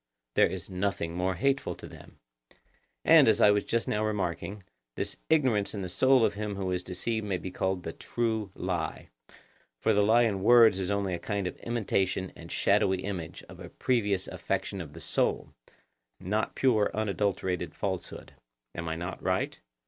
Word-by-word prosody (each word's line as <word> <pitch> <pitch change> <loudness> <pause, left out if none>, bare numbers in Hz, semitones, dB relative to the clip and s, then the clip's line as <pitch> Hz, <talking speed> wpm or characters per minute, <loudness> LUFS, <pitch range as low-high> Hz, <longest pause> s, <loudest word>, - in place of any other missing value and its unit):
There - - +5
is - - -6
nothing 90 -3 -2
more 90 +1 0
hateful 135 +9 0
to - - -11
them. - - -13 0.9
And, - - +7
as - - +4
I 105 - +7
was 105 -1 +2
just 115 0 -1
now 105 +1 0
remarking, 100 -2 -2 0.3
this - - -3
ignorance 130 -11 +2
in 100 - -4
the 90 - -4
soul 130 +5 +4
of 105 - 0
him 105 0 -4
who 95 -1 -2
is 90 0 -1
deceived 110 +5 -2
may 100 -3 -1
be 95 +1 -6
called 95 -1 -1
the - - -5
true 110 -3 -2
lie; 90 -3 -3 0.7
for - - +2
the 105 - +4
lie 110 +4 +5
in 100 -5 0
words 115 -2 +6
is 95 -1 -2
only 100 -2 0
a 85 - -2
kind 100 +2 -2
of 90 - -3
imitation 95 -5 -1
and 85 0 -11
shadowy 100 -2 +2
image 90 -5 -5
of - - -13
a - - -9
previous 105 -7 0
affection 100 - -3
of 75 -4 -9
the 80 - -10
soul, - - -1 0.7
not 105 +4 -1
pure 115 -6 +3
unadulterated 100 -4 -1
falsehood. 95 -3 -5 0.4
Am 85 -1 -4
I 80 - -2
not 85 +2 -5
right? - - -1
100 Hz, 180 wpm, -29 LUFS, 90-110 Hz, 0.9 s, And